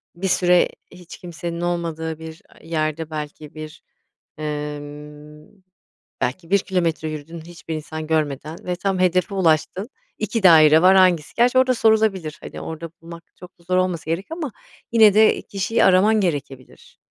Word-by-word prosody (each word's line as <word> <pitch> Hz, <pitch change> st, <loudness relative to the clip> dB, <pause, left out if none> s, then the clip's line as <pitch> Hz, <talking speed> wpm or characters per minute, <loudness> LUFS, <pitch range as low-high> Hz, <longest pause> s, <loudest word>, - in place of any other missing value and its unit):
Bir 190 Hz, +3 st, -3 dB
süre 180 Hz, -1 st, +3 dB, 0.2 s
hiç 180 Hz, -1 st, -12 dB
kimsenin 170 Hz, -1 st, -6 dB
olmadığı 165 Hz, -2 st, -3 dB
bir 160 Hz, 0 st, -10 dB
a -, -, -21 dB
yerde 160 Hz, -1 st, -2 dB
belki 150 Hz, -1 st, -7 dB
1, 155 Hz, 0 st, -9 dB, 0.6 s
ımm, 150 Hz, +3 st, -8 dB, 0.6 s
belki 135 Hz, +7 st, -3 dB
1 200 Hz, -, +5 dB
kilometre 170 Hz, -5 st, -1 dB
yürüdün, 155 Hz, +2 st, -8 dB
hiçbir 165 Hz, -1 st, -8 dB
insan 155 Hz, 0 st, -6 dB
görmeden 155 Hz, 0 st, -2 dB
ve 180 Hz, -, -2 dB
tam 190 Hz, +1 st, -2 dB
hedefe 185 Hz, +2 st, +1 dB
ulaştın, 185 Hz, -, +1 dB, 0.3 s
2 230 Hz, -3 st, -3 dB
daire 160 Hz, -3 st, +7 dB
var 185 Hz, +2 st, +6 dB
hangisi, 180 Hz, -5 st, +3 dB
gerçi 245 Hz, +2 st, +3 dB
orada 260 Hz, 0 st, +3 dB
sorulabilir, 215 Hz, -9 st, +1 dB
hani, -, -, -8 dB
orada 160 Hz, 0 st, -7 dB
bulmak 170 Hz, 0 st, -11 dB
çok 180 Hz, 0 st, -15 dB
da -, -, -22 dB
zor 185 Hz, +1 st, 0 dB
olmasa 175 Hz, -4 st, -1 dB
gerek 175 Hz, +4 st, -3 dB
ama 325 Hz, -5 st, -4 dB, 0.4 s
yine 220 Hz, -3 st, +6 dB
de 215 Hz, +1 st, +4 dB
kişiyi 200 Hz, +3 st, -1 dB
araman 205 Hz, +4 st, +4 dB
gerekebilir. 140 Hz, -7 st, -5 dB
170 Hz, 150 wpm, -21 LUFS, 155-185 Hz, 0.6 s, daire